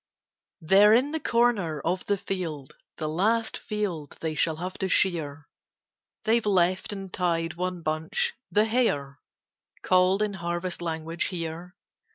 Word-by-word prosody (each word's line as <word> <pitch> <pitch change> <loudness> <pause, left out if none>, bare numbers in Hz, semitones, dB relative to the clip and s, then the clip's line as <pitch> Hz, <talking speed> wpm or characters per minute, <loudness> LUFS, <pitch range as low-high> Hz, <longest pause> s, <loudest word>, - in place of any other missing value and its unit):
END 160 - -11
OF 205 +2 +8
in 260 +6 +3
the 320 - -1
corner 230 - +1
of 180 +5 -1
the 205 - +2
field, 165 -8 -5
* - - -64
The 155 - -3
last 220 +8 +1
field 190 -9 -4
they 160 -1 -2
shall 160 +1 +2
have 180 +3 -5
to 190 - -1
shear, 160 -6 0 0.8
They've 225 +1 +3
left 185 -2 +2
and 195 -2 -7
tied 165 -2 0
one 180 0 -3
bunch, 160 - -1
* - - -61
the 210 +1 +4
hare/ 145 - 0 0.6
Called 185 +2 +3
in 210 -1 -1
harvest 175 0 -3
language 165 0 -2
here. 170 +1 -5
180 Hz, 155 wpm, -27 LUFS, 160-205 Hz, 0.8 s, OF